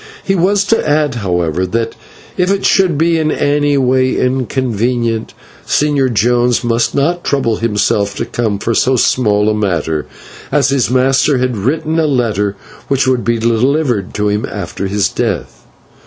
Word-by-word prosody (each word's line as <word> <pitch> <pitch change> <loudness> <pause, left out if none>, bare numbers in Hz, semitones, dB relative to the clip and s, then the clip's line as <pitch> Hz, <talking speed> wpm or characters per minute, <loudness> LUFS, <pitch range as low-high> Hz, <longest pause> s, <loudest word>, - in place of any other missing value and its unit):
He 195 - 0
was 195 +2 +2
to 205 -6 0
add, 150 -2 +1
however, 90 -6 -1
that 115 +5 -2 0.4
if 180 0 0
it 200 0 0
should 185 -6 +3
be 165 +1 +2
in 155 -1 0
any 145 0 +1
way 130 0 +2
inconvenient, 120 -3 -1 0.3
the - - -21
Señor 145 -3 +1
Jones 120 +3 +2
must 120 0 0
not 170 +5 0
trouble 115 -6 0
himself 105 -2 0
to - - -3
come 110 -4 -2
for 115 +3 -2
so 130 +4 +2
small 105 -4 +2
a 110 - +2
matter, 85 -7 -1 0.4
as 140 -2 +2
his 135 -4 +1
master 130 +2 +2
had 125 -1 -1
written 155 +9 -1
a 160 - +2
letter 110 -7 0 0.3
which 135 -1 +1
would 130 -2 +1
be 120 0 0
delivered 120 -1 0
to 105 0 0
him 105 +1 -1
after 100 - -4
his 100 0 +1
death. 60 -1 -4
125 Hz, 165 wpm, -14 LUFS, 105-145 Hz, 0.4 s, should